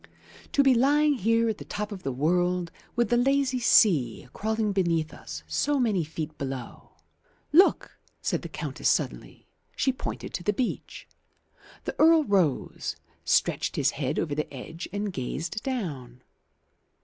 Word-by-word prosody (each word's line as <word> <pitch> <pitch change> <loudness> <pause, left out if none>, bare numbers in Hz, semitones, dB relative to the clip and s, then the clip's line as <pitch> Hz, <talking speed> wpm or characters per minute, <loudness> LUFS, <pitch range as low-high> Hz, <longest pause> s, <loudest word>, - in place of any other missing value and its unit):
To 280 - +5
be 270 -1 +6
lying 290 +5 +4
here, 230 -1 +2
at 220 -2 -2
the - - -7
top 210 +1 -5
of 195 -3 -6
the 135 - -2
world, 175 +5 +1 0.2
with 240 -3 +1
the 240 - +4
lazy 265 0 +2
sea 150 - +4
crawling 220 0 -1
beneath 170 -5 0
us 80 0 -8
so 280 - 0
many 215 -8 +2
feet 155 0 -6
below 135 -3 -6 0.3
" - - -45 0.3
"Look," 370 +5 +4 0.2
said - - -1
the - - -7
Countess - - -2
suddenly. - - -2 0.3
She 265 - +1
pointed - - -6
to 175 - -4
the 210 - +1
beach. 245 +3 -4 0.8
The - - -4
Earl 320 0 +6
rose, 190 - 0 0.3
stretched - - +1
his - - +2
head 140 0 -2
over 150 - -1
the 150 +1 -3
edge 155 +5 -8
and 205 -1 -3
gazed 165 +10 -4
down. 140 - -5
195 Hz, 155 wpm, -27 LUFS, 150-240 Hz, 0.8 s, be